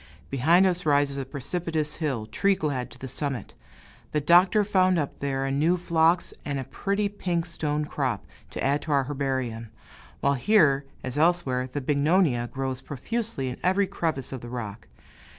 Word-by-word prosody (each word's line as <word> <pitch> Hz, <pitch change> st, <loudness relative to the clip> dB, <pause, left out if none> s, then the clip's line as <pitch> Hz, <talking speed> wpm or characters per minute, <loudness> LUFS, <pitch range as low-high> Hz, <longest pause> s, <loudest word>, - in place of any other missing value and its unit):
Behind 165 Hz, +8 st, +4 dB
us 180 Hz, -1 st, +1 dB
rises 145 Hz, -2 st, +2 dB
a 135 Hz, -, -3 dB
precipitous 155 Hz, +3 st, -3 dB
hill, 135 Hz, -9 st, -2 dB
tree 195 Hz, -, +1 dB
clad 140 Hz, -7 st, -2 dB
to -, -, -14 dB
the 130 Hz, -, -7 dB
summit. 135 Hz, -4 st, -4 dB, 0.6 s
The 150 Hz, -, +2 dB
Doctor 180 Hz, +7 st, +5 dB
found 185 Hz, -3 st, +3 dB
up 145 Hz, -4 st, -2 dB
there 135 Hz, -1 st, -1 dB
a 135 Hz, -, -1 dB
new 155 Hz, +6 st, +2 dB
phlox 170 Hz, 0 st, +2 dB
and 140 Hz, -1 st, -2 dB
a 135 Hz, -, -2 dB
pretty 200 Hz, +9 st, -1 dB
pink 180 Hz, -4 st, -2 dB
stone 150 Hz, -3 st, -2 dB
crop, 130 Hz, -8 st, -2 dB, 0.2 s
to -, -, -5 dB
add 140 Hz, +2 st, +2 dB
to 155 Hz, -, -5 dB
our 140 Hz, -1 st, +3 dB
herbarium, 130 Hz, -5 st, -3 dB, 0.5 s
while 140 Hz, -, +2 dB
here 140 Hz, -, +3 dB, 0.2 s
as 130 Hz, +3 st, -3 dB
elsewhere 140 Hz, -7 st, +2 dB
the 145 Hz, -, -3 dB
bignonia 145 Hz, -2 st, +2 dB
grows 130 Hz, -1 st, -3 dB
profusely 160 Hz, -, -3 dB
in 125 Hz, -, -6 dB
every 190 Hz, +2 st, +3 dB
crevice 165 Hz, -8 st, -3 dB
of 130 Hz, -3 st, -5 dB
the 120 Hz, -, -8 dB
rock. 110 Hz, -5 st, -6 dB
145 Hz, 170 wpm, -26 LUFS, 130-175 Hz, 0.6 s, Doctor